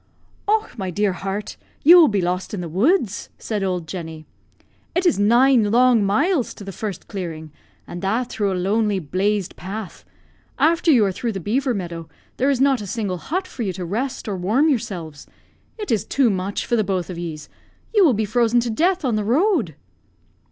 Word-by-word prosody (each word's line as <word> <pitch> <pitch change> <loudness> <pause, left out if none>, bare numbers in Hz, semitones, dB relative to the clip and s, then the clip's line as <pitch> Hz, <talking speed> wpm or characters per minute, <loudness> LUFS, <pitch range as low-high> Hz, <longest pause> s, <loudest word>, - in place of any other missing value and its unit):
"Och, 430 +1 0
my 190 -1 -2
dear 200 +2 0
heart, 195 +2 -5 0.3
you 335 +5 +9
will 325 - +7
be 205 -6 0
lost 180 +3 -2
in 185 - -4
the 175 - -5
woods!" 215 - +1
said 215 -3 -3
old 180 -4 -2
Jenny. 160 -2 -7 0.7
"It 360 +2 +1
is 345 - +3
nine 235 +1 +4
long 240 -1 +4
miles 275 - +1
to - - -10
the 195 - -6
first 200 -1 -6
clearing, 160 -5 -6 0.3
and 175 - -8
that 225 +6 0
through 205 -4 -1
a 185 - -1
lonely, 205 +2 +1
blazed 190 +4 -1
path. 195 +1 -7 0.5
After 335 +1 +2
you 245 -9 +5
are 195 - 0
through 230 +4 -3
the 195 - -4
beaver 250 - 0
meadow, 170 -4 -6 0.3
there 270 - +2
is 275 -3 +1
not 270 -3 +3
a 205 - -6
single 200 -3 -2
hut 370 - -3
for 265 - -8
you 195 -5 -1
to 180 0 -5
rest 245 +10 -3
or 205 - -2
warm 225 - +2
yourselves. 185 - -3 0.5
It 420 -2 -5
is 220 -4 +1
too 265 -5 +2
much 190 +1 -2
for 240 - 0
the 220 - +2
both 185 -3 -2
of 170 - -6
yees; 160 -3 -6 0.5
you 415 -3 +5
will 285 -9 +4
be 215 +1 0
frozen 235 +2 +2
to 235 -1 -2
death 345 +7 +1
on 235 -4 +1
the 210 - -1
road." 255 - +1
210 Hz, 200 wpm, -21 LUFS, 185-255 Hz, 0.7 s, you